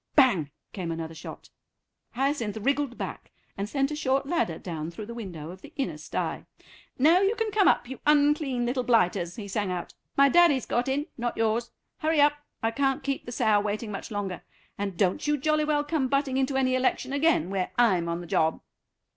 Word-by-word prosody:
"Bang," 220 - +4 0.2
came 180 -4 -4
another 165 0 -5
shot. 160 - -10 0.6
Hyacinth 250 -5 -1
wriggled 275 +2 0
back, - - -6 0.3
and 200 +1 -4
sent 275 +2 0
a - - -2
short 270 -2 0
ladder 275 - 0
down 160 -3 -5
through 170 +5 -7
the 235 - -7
window 175 -9 -7
of 185 +1 -12
the 295 - -13
inner 275 -3 -3
stye. - - -4 0.5
"Now 320 +7 +5
you 395 +3 +2
can 450 -2 -1
come 405 -2 +4
up, - - +3
you 265 - -7
unclean 290 -4 +3
little 250 +2 0
blighters," 180 -7 +2
he 210 -3 -7
sang 200 -1 -1
out; 180 -1 -4 0.2
"my 275 0 +7
daddy's 310 -4 +5
got 245 +2 0
in, 280 +3 0
not 240 0 -2
yours. 225 +1 +1 0.3
Hurry 315 0 +1
up, 290 0 +6 0.3
I 225 - +2
can't 270 +2 0
keep 275 -3 -3
the - - -5
sow 220 -4 +3
waiting 210 +1 -3
much 195 - -6
longer. 200 -4 -4 0.3
And 200 -3 -4
don't 190 - +1
you 295 0 +2
jolly 305 +2 +1
well 295 -1 +1
come 295 -3 0
butting 275 0 0
into 265 0 +1
any 260 -1 +2
election 255 +1 0
again 280 - +2
where 190 -2 -1
I'm 185 -8 +3
on 170 +1 -2
the - - -8
job." 160 0 +1
245 Hz, 200 wpm, -27 LUFS, 195-285 Hz, 0.6 s, my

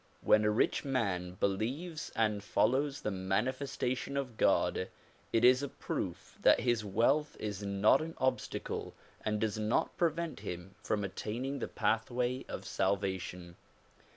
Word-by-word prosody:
When 105 - +5
a 105 - +3
rich 105 - +2
man 100 -10 -1
believes 130 - -2
and 105 -2 +1
follows 135 +6 +1
the 105 - -1
manifesta 125 +7 -1
tion 140 +2 -4
of 130 -4 -3
God - - +2 0.4
it 115 +1 +4
is 125 +1 +7
a 140 - -2
proof - - -5
that - - +6
his 120 -3 +1
wealth 125 +9 +2
is 105 -2 -4
not 100 +6 +4
an 165 +1 -5
obstacle 130 0 -2 0.3
and 105 0 0
does 110 -1 -1
not 110 +1 +1
prevent 170 - 0
him 90 -2 -6
from 105 -1 -1
attaining 120 +8 -3
the - - -2
pathway 120 +3 0
of - - -5
salvation. 95 -3 -2
110 Hz, 145 wpm, -33 LUFS, 100-130 Hz, 0.4 s, is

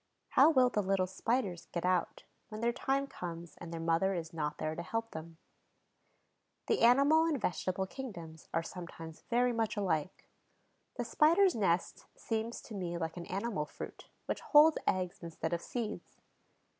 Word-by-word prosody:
How - - +6
will 260 -5 +5
the 210 - 0
little 195 -1 +1
Spiders 190 -1 -1
get 170 0 -2
out, 180 -1 0 0.3
when 215 - -6
their 235 +1 +1
time 275 +2 0
comes 170 - -7
and 170 -1 -8
their 165 - -4
mother 165 +4 +2
is 165 -2 -5
not 150 -2 -2
there 155 - -2
to 165 - -4
help 225 +5 -3
them? 160 +1 -8 1.3
The 445 - +1
animal 280 +7 +6
and 315 -4 0
vegetable 185 -1 -1
kingdoms 175 - -8
are 165 - 0
sometimes 165 -2 -8
very 245 0 +3
much 225 -2 -1
alike. 185 -4 -1 0.7
The - - -2
Spider's 340 +5 +4
nest 185 -5 0
seems 225 +1 -3
to 225 - -10
me 175 -4 -3
like 165 -1 -3
an 175 -1 -7
animal 195 -6 -2
fruit, - - -9 0.2
which - - -3
holds 305 +1 +6
eggs 180 -1 0
instead 165 -1 -4
of 170 - -1
seeds. 225 0 -5
190 Hz, 165 wpm, -33 LUFS, 170-235 Hz, 1.3 s, How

